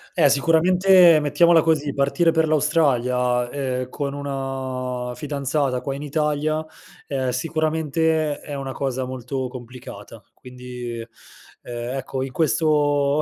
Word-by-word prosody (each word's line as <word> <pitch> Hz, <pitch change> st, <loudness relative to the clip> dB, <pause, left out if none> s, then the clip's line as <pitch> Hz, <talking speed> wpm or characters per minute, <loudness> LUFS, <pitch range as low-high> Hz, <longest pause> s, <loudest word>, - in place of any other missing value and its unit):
Eh, 155 Hz, -5 st, +5 dB
sicuramente, 175 Hz, +3 st, +5 dB
mettiamola 160 Hz, +3 st, +4 dB
così: 150 Hz, -3 st, 0 dB
partire 150 Hz, +5 st, +2 dB
per 160 Hz, -1 st, +2 dB
l'Australia, 125 Hz, -6 st, +1 dB
ehm, 130 Hz, -2 st, -3 dB
con 140 Hz, +1 st, -4 dB
una 130 Hz, -3 st, -4 dB
fidanzata 140 Hz, -2 st, -2 dB
qua 135 Hz, -, -3 dB
in 140 Hz, -, -7 dB
Italia, 150 Hz, +1 st, -1 dB, 0.4 s
ehm, 130 Hz, -2 st, -1 dB
sicuramente 155 Hz, +2 st, 0 dB
è 145 Hz, -, -7 dB
una 135 Hz, -1 st, -5 dB
cosa 130 Hz, -1 st, -2 dB
molto 130 Hz, +1 st, -4 dB
complicata. 120 Hz, -4 st, -10 dB
Quindi, 125 Hz, -2 st, -8 dB, 0.6 s
ehm, 120 Hz, +1 st, -5 dB
ecco 130 Hz, 0 st, -4 dB
in 135 Hz, -, -5 dB
questo 150 Hz, -2 st, +2 dB
140 Hz, 120 wpm, -22 LUFS, 125-155 Hz, 0.6 s, Eh